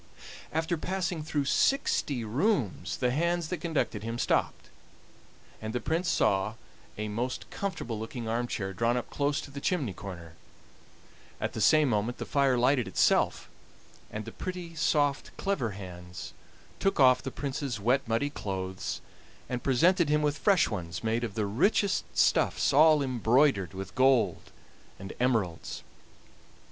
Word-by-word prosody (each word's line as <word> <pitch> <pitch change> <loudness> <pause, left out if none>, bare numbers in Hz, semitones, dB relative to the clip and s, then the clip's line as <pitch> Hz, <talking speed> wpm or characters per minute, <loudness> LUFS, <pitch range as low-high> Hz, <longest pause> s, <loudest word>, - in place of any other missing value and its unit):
After 160 +2 0
passing 180 -2 -2
through 150 -2 -1
sixty 140 - +1
rooms 120 - 0
the 125 -1 +1
hands 170 +3 0
that 180 -4 -3
conducted 155 - -1
him 115 +2 -4
stopped, - - -1 0.9
and 110 0 -4
the 125 - 0
Prince 165 +6 -1
saw 95 +3 +1 0.4
a 105 0 -3
most 120 +5 -3
comfortable 125 - -4
looking 115 +1 -5
arm 120 +2 -1
chair 95 -4 -3
drawn 115 +5 +1
up 125 - -5
close 145 0 0
to 140 - -10
the 140 0 -7
chimney 145 - 0
corner; 90 -4 -9 1.1
at - - -2
the 110 - -3
same 155 +6 +5
moment 115 +1 0
the - - -5
fire 140 -3 +2
lighted 125 0 +2
itself, - - +2 0.6
and 110 0 -6
the 115 - -7
pretty, 180 +1 -6
soft, 145 -3 0
clever 140 - -1
hands 90 -2 -9 0.5
took 195 - +1
off 130 -2 +6
the - - -4
Prince's 135 -3 -4
wet, 125 +6 +2
muddy 115 +6 0
clothes, 95 -6 -4 0.5
and 125 -1 -3
presented 165 +6 +3
him 150 0 +2
with 145 -1 +1
fresh 195 -4 +4
ones 85 -4 -5
made 115 +2 0
of 110 -4 -4
the 110 -2 0
richest 185 - +2
stuffs, - - +3
all 155 0 +6
embroidered 120 - +2
with 95 0 -6
gold 130 -2 +2 0.5
and 95 0 -8
emeralds. 110 -10 -1
125 Hz, 150 wpm, -29 LUFS, 110-150 Hz, 1.1 s, off